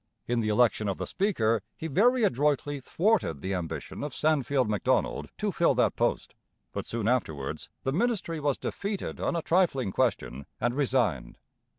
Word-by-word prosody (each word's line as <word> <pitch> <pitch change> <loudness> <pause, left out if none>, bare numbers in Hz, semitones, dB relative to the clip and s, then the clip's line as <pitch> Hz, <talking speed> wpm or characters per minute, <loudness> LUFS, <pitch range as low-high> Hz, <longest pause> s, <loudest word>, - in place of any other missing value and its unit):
In 120 0 0
the 110 -2 0
election 110 -1 +3
of 95 - -2
the - - -3
Speaker 115 - +1 0.2
he - - -6
very 230 - +3
adroitly 145 - +1
thwarted 170 - +1
the 95 +1 -2
ambition 90 - -4
of 145 - -4
Sandfield 140 -4 +2
Macdonald 105 -1 0
to - - -1
fill - - +2
that - - +2
post; - - -1 0.4
but, - - -5
soon 115 -2 -2
afterwards, 80 - -1
the 135 - 0
ministry 190 -4 0
was 145 -2 0
defeated 200 0 -4
on - - -1
a 165 - -1
trifling 165 - +2
question 65 -6 -1
and 120 - +1
resigned. 125 - 0
130 Hz, 165 wpm, -28 LUFS, 110-165 Hz, 0.4 s, election